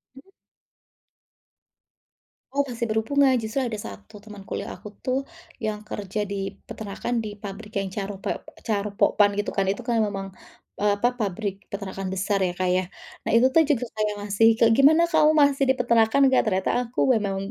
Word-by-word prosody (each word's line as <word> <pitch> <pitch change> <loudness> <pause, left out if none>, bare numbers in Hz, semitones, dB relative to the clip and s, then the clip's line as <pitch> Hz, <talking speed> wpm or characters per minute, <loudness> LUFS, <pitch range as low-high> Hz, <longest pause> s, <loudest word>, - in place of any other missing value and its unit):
Mhm. 270 +8 -16 2.2
Oh, 285 +1 +2
masih 235 -1 -3
berhubungan, 260 +5 +2
justru 220 +5 -2
ada 240 -4 -2
1 205 0 -10
teman 210 -2 -11
kuliah - - -4
aku - - -11 0.2
tuh, 255 0 0 0.5
yang 215 -1 -3
kerja 210 -1 -4
di - - -2 0.3
peternakan 220 +3 -4
di 210 -1 -6
pabrik 210 +2 -8
yang 195 -1 -1
Charope 200 0 -5 0.3
Charoen 205 -2 -2
Pokphand 205 0 +3
gitu 205 0 -2
kan. 195 - 0
Itu 200 +6 -1
kan 235 -1 0
memang, 195 -1 -4 0.5
eee, 205 0 +3
apa, 240 +4 +2
pabrik 200 -1 -3
peternakan 195 -1 -5
besar 200 +2 0
ya, 175 - -4
Kak, 185 0 0
ya. 185 +1 +2 0.4
Nah - - +1
itu 240 +3 +6
tuh 320 +4 +5
juga 255 -5 +1
kayak, 210 -1 -1
masih 205 +2 +3
kek, 230 -1 +5
"Gimana 310 +5 +6
kamu 305 -2 +5
masih 280 -1 +3
di - - +6
peternakan 235 +1 +3
nggak?" 260 - +5
Ternyata 190 -2 +1 0.2
aku 240 - -6
memang 200 -4 -1
215 Hz, 170 wpm, -24 LUFS, 200-240 Hz, 2.2 s, itu